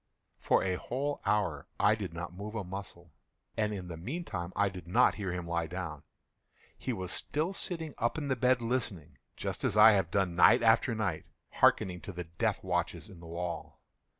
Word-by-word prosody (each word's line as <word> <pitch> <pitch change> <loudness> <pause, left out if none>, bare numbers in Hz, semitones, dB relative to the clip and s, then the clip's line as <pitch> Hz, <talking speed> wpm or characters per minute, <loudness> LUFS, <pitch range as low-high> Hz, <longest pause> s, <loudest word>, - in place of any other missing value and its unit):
For - - +3
a 95 -1 0
whole 140 +7 -3
hour 90 -9 0
I 105 +1 +5
did 100 -6 -4
not 85 +1 -6
move 105 +4 -7
a 105 - -2
muscle, 90 -2 -8 0.4
and 105 -1 0
in 95 -4 -5
the 85 -2 -6
meantime 95 - -4
I 100 - +3
did 90 -3 -7
not 90 - +4
hear 100 -3 -3
him 90 -1 -4
lie 85 -1 -1
down. 80 -4 -5 0.7
He 130 - -4
was 95 -6 -4
still 160 +6 -1
sitting 165 -6 -2
up 120 +5 0
in 150 -2 -3
the 130 - +1
bed 125 0 +2
listening;—just 95 - -4
as 105 - +1
I 110 +1 +10
have 95 -5 +2
done, 95 -1 +1
night 90 - +6
after 115 +1 +4
night, 95 -8 -2 0.2
hearkening 90 -2 +3
to - - -7
the 90 -1 -5
death 85 0 -2
watches - - -2
in 90 - -12
the 85 - -11
wall. 85 +1 -5
95 Hz, 190 wpm, -31 LUFS, 85-115 Hz, 0.7 s, I